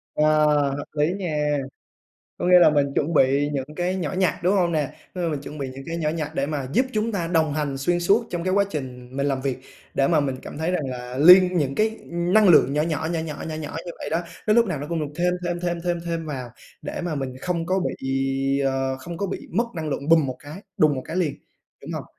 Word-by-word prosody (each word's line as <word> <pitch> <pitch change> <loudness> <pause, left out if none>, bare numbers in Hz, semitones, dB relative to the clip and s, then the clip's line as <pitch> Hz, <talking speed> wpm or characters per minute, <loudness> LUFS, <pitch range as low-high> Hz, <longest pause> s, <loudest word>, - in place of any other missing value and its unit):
Ờ, 155 0 +4 0.3
hợp 145 - -5
lý 155 +4 +1
nha. 150 -6 -1 0.8
Có - - -1
nghĩa 180 0 +8
là 170 -3 +7
mình 145 -2 +2
chuẩn 155 +3 0
bị 140 +1 +3
những 140 +2 -4
cái 180 +1 -1
nhỏ 170 -3 -3
nhặt, 185 -4 +1
đúng 185 +3 +3
hông 175 -2 +2
nè? 150 -4 0 0.2
Ơ, 175 -2 -1
mình 150 -3 -2
chuẩn 150 +2 -9
bị 135 -2 -3
những 130 +1 -9
cái 165 0 -3
nhỏ 155 -2 -1
nhặt 155 -1 -2
để 140 -1 0
mà 145 -3 -3
giúp 255 - +3
chúng 220 +1 0
ta 180 -5 -1
đồng 160 -3 +1
hành 145 -3 -2
xuyên 175 +5 +1
suốt 205 +7 +3
trong 175 -1 -3
cái 185 - 0
quá 200 +1 +4
trình 130 -4 -6
mình 140 0 0
làm 135 -2 0
việc, 135 -2 -2 0.4
để 135 0 +2
mà 160 -3 +4
mình 135 -2 -1
cảm - - -8
thấy 160 +2 0
rằng 175 -6 -1
là 125 0 -6
liên 180 +4 +8
những 140 -4 0
cái 220 +1 0
năng 180 +5 +3
lượng 155 -5 +6
nhỏ 150 +1 +2
nhỏ, 160 0 -1
nhỏ 165 - -1
nhỏ, 160 -2 -6
nhỏ 160 - -4
nhỏ 155 -1 -6
như - - -4
vậy - - -6
đó, 165 - +1 0.3
nó 215 - +4
lúc 235 0 +5
nào 170 -7 -2
nó 145 - -5
cũng 170 -1 -1
được 150 -1 -4
thêm, 180 +1 +1
thêm, 175 0 -2
thêm, 175 -1 -1
thêm, 175 -1 0
thêm 165 -1 -3
vào 130 -5 -5 0.3
để - - -5
mà 175 -3 -3
mình 135 -3 -4
không 170 -1 -2
có 190 +2 +1
bị, 135 0 -3 0.5
ờ, 135 0 0
không 170 +6 -8
có 200 - -2
bị 195 - -6
mất 225 +7 +2
năng 160 -2 -4
lượng 140 0 -3
bùm 165 -3 +5
một 130 - -4
cái 150 +7 -10
đùng 155 -2 +4
một 130 - -4
cái 165 - -5
liền, 165 -6 0 0.5
đúng - - -7
hông? - - -4
155 Hz, 260 wpm, -24 LUFS, 140-175 Hz, 0.8 s, nghĩa